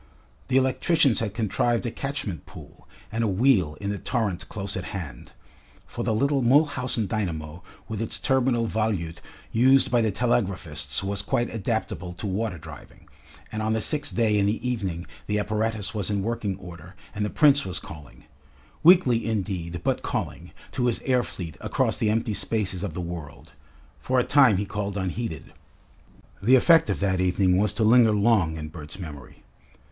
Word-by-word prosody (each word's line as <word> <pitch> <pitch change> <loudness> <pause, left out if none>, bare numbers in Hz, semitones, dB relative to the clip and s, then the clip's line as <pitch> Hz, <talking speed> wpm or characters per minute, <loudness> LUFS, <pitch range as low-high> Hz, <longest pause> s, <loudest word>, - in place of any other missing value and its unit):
The 130 - +2
electricians 135 0 +3
had 110 -2 -3
contrived 115 +2 0
a 120 - -1
catchment 135 - -5
pool - - -14 0.2
and 115 +2 -1
a - - +2
wheel 95 - +2
in 100 0 -2
the 100 - -4
torrent 105 -8 -2
close 100 -1 -4
at 95 - -4
hand 75 -10 -8 0.5
for - - -5
the - - 0
little 140 +5 +2
Mulhausen 125 -3 +2
dynamo 85 -6 -3 0.3
with 110 -1 -4
its 110 -2 -3
turbinal 125 +1 +1
volute 100 -7 -2 0.3
used 130 +4 +4
by 120 -1 +4
the 110 -2 +1
telegraphists 100 -8 -1
was 100 +1 0
quite 120 +4 -1
adaptable 110 -4 -3
to 90 - -7
water 100 -1 -2
driving, - - -13 0.4
and 110 - -3
on 110 +1 0
the 110 - +1
sixth 145 +5 -2
day 110 -3 +3
in 100 - +2
the 110 +4 -1
evening 95 -8 -2 0.2
the 105 - 0
apparatus 110 0 -1
was 105 -3 -2
in 100 -2 0
working 110 -3 -2
order 90 0 -11 0.2
and 105 0 -2
the 105 - -1
Prince 145 +2 +4
was 95 -3 -4
calling 75 -4 -10 0.6
weakly, 160 -9 +6
indeed, 95 -6 -3
but - - 0
calling - - -4 0.2
to 125 - 0
his 120 - +1
air 125 -2 +2
fleet 85 -9 -6
across - - 0
the 110 - +1
empty 110 0 0
spaces 100 -4 -2
of 95 -6 -4
the 90 - -3
world. 85 -4 -8 0.5
For 130 0 +1
a - - +3
time 130 -8 +5
he 100 - -1
called 100 0 -4
unheeded. 95 -3 -4 0.9
The 120 +6 +5
effect 165 +5 +5
of - - -1
that 95 -2 +1
evening 90 0 +2
was 105 0 +2
to 110 - 0
linger 115 0 +6
long 100 -7 +2
in 75 -1 -6
Bert's 75 0 -9
memory. 75 -7 -10
105 Hz, 175 wpm, -25 LUFS, 95-120 Hz, 0.9 s, weakly